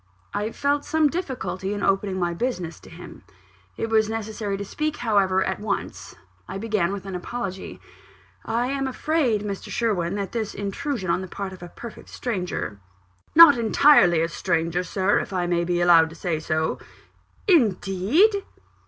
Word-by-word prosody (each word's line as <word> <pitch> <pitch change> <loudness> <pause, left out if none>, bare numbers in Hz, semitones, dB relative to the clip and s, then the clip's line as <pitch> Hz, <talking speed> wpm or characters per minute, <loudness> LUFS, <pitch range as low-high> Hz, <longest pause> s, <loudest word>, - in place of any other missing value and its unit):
I 210 +2 -2
felt 285 +3 0
some 315 -2 +2
difficulty 250 - -3
in 205 - -4
opening 195 -1 +1
my 175 -2 0
business 180 -5 -3
to - - -15
him. - - -11 0.6
It 225 - -2
was 220 -1 +3
necessary 220 -2 -3
to 200 - -5
speak, 305 +8 -3
however, 195 -5 +2
at 190 - -2
once 210 0 -4 0.3
I - - -5
began 200 -4 0
with 200 -1 -5
an 195 - -6
apology. 190 +1 -5 0.6
"I 235 +2 -1
am 275 0 -1
afraid, 260 -6 0
Mr. 200 -2 -5
Sherwin, 200 -6 -1
that 200 -2 -3
this 220 -3 -3
intrusion 200 0 -3
on 180 - 0
the 185 - -6
part 190 +1 -6
of 185 - -12
a 175 - -8
perfect 235 +5 -11
stranger 180 - -4 0.3
" 90 +2 -38
"Not 310 -6 +9
entirely 220 - +5
a 165 - +1
stranger, 170 0 -1
Sir, 190 +3 +1
if - - -5
I 180 -1 0
may 175 -1 +1
be 175 0 0
allowed 165 -2 +6
to 160 - -12
say 165 -2 -2
so." 155 0 -1 0.7
"Indeed!" 280 - +3
200 Hz, 170 wpm, -24 LUFS, 180-235 Hz, 0.7 s, Not